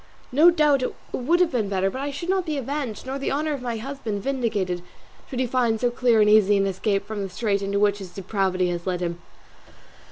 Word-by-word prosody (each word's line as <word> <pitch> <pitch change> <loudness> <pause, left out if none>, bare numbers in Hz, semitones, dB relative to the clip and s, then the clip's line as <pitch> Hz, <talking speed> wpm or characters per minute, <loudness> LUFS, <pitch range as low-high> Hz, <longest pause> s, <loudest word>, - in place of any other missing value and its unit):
No 305 +7 +7
doubt 300 -5 +3
it 255 - -2 0.2
would 320 +8 +1
have 355 - +3
been 220 -6 0
better; 195 0 0
but 260 - -5
I 285 - -2
should 285 +5 -6
not 380 -1 +1
be 305 -2 -1
avenged, 270 -4 -4
nor 265 +1 -4
the 275 - -2
honour 300 +2 0
of 280 - -5
my 240 -2 -3
husband 225 -5 -5
vindicated, 215 -10 -1 0.5
should 255 - -4
he 260 - +2
find 240 -3 +1
so 245 +1 +1
clear 240 -2 +3
and 210 - +5
easy 210 -1 +5
an 195 - +2
escape 195 +1 -1
from 210 -1 -4
the 195 - -3
strait 200 +1 -1
into 200 0 -1
which 205 0 +2
his 190 -2 -8
depravity 185 -1 -1
has 175 +1 -4
led 180 -1 -1
him. 170 0 -3
220 Hz, 230 wpm, -24 LUFS, 195-270 Hz, 0.5 s, No